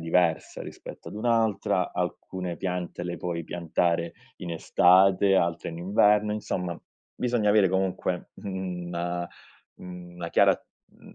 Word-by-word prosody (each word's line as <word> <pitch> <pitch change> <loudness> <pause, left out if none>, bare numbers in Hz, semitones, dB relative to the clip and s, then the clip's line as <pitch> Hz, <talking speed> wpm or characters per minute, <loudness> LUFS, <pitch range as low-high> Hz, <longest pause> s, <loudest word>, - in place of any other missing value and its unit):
diversa 85 0 +1
rispetto - - -9
ad - - -9
un'altra, 110 -1 +1
alcune 90 -2 -3
piante 90 -1 -3
le 85 0 -3
puoi 85 0 -3
piantare 85 0 -1 0.2
in 90 -2 -6
estate, 95 +3 +5
altre 85 -2 0
in 85 0 -6
inverno; 105 +3 +3
insomma, 90 -5 -3 0.4
bisogna 120 -4 +1
avere 105 -2 +5
comunque, 95 -1 -1
mhmm, 95 -3 -5
una 85 0 -3 0.5
mhmm, 90 -1 -10
una 85 -1 -5
chiara, - - +4 0.4
mhmm, - - -16
90 Hz, 130 wpm, -27 LUFS, 85-95 Hz, 0.5 s, estate